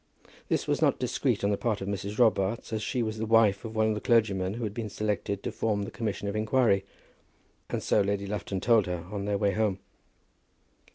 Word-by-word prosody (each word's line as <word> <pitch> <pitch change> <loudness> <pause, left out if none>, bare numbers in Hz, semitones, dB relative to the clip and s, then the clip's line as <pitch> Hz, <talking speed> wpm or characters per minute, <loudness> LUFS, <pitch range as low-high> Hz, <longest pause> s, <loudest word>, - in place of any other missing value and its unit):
This - - +1
was - - 0
not - - +3
discreet - - 0
on 100 - +2
the 100 - +1
part 110 -4 0
of 95 - -5
Mrs. 100 +1 -4
Robarts, 110 -2 +2
as 110 - -1
she 120 +3 -1
was 110 0 -3
the 110 - -1
wife 110 -3 +4
of 110 -1 -7
one 110 0 +3
of - - +1
the 105 - -4
clergymen 100 -5 +2
who 120 - -4
had 105 -2 -3
been 110 -1 -4
selected 100 -1 -2
to - - -2
form 105 -2 -1
the - - -6
commission 105 -3 -3
of 100 - -3
inquiry; 110 -2 +2 0.9
and - - -3
so - - +3
Lady 100 0 -1
Lufton 100 -1 -3
told 110 -1 +4
her 90 -2 -4
on 100 -1 -3
their 100 -1 0
way 100 0 +2
home. 105 -1 0
105 Hz, 220 wpm, -28 LUFS, 100-110 Hz, 0.9 s, wife